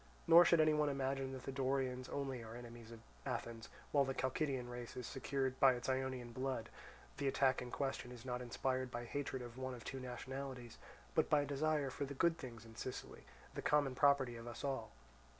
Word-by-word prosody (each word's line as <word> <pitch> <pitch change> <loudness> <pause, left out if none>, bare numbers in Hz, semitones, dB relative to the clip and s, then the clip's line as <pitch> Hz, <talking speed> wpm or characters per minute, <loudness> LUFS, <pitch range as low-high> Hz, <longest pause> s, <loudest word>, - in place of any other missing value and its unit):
Nor 170 +1 +10
should 170 - +6
any 155 0 +6
one 150 -1 +3
imagine 135 -1 -1
that 130 - -6
the - - -3
Dorians 130 -1 0
only 135 -3 -2
are 110 +1 -8
enemies 120 -1 -9
of 115 -1 -10 0.2
Athens, 115 -3 -4 0.2
while 140 -1 +5
the 135 -1 -2
Chalcidian 130 0 0
race 120 0 -6
is 125 - -4
secured 135 0 -1
by 135 -1 +8
its 120 - -5
Ionian 130 -2 -1
blood; 130 -2 -2 0.5
the 140 - 0
attack 135 -1 +3
in 125 - -5
question 135 -2 -2
is 120 0 -10
not 125 -1 -2
inspired 130 +1 -1
by 120 0 -4
hatred 135 -1 -3
of 120 +1 -8
one 130 -1 -3
of 120 - -10
two 135 - -4
nationalities, 130 -1 -6 0.3
but - - +3
by 150 -1 +5
a - - -1
desire 145 0 +1
for 140 - -2
the 140 +1 -6
good 165 +3 +3
things 115 -4 -8
in 115 0 -13
Sicily, 130 - -6 0.3
the - - -3
common 145 -3 +3
property 135 -2 +4
of 115 +1 -8
us 120 - -6
all. 135 -5 -1
130 Hz, 205 wpm, -39 LUFS, 120-140 Hz, 0.5 s, Nor